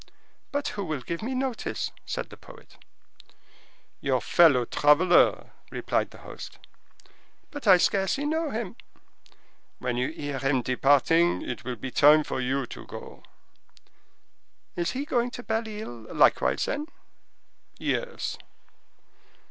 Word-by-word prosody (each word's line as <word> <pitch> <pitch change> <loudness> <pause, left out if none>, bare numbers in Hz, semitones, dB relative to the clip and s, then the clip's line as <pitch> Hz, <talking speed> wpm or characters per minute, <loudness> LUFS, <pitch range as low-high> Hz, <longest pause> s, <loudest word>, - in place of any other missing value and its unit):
"But 285 +1 -1
who 205 -1 -4
will 155 -6 -3
give 170 +6 -5
me 255 +4 -3
notice?" 260 -2 -2 0.2
said - - -4
the - - -9
poet. - - -16 1.2
"Your - - +1
fellow 145 -8 +5
traveler," 150 +8 +4 0.2
replied - - -1
the - - -14
host. - - -9 0.9
"But 290 -6 -7
I 185 -2 +9
scarcely 195 +10 +1
know 320 +1 0
him." 225 -3 -4 1.0
"When 125 -1 -2
you 125 +3 0
hear 145 -3 -5
him 135 -1 +1
departing, 145 +7 +3
it 125 - -5
will 125 0 -4
be 130 +4 -6
time 150 +4 +6
for 130 - -3
you 130 +1 -1
to - - -10
go." - - -10 1.5
"Is 170 -1 -1
he 270 +3 -3
going 245 -4 0
to 245 - -8
Belle 225 0 -2
Isle, 120 - -8
likewise, 65 +2 +3
then?" 295 +2 -3 0.9
"Yes." 485 -1 -3
170 Hz, 130 wpm, -27 LUFS, -, 1.5 s, I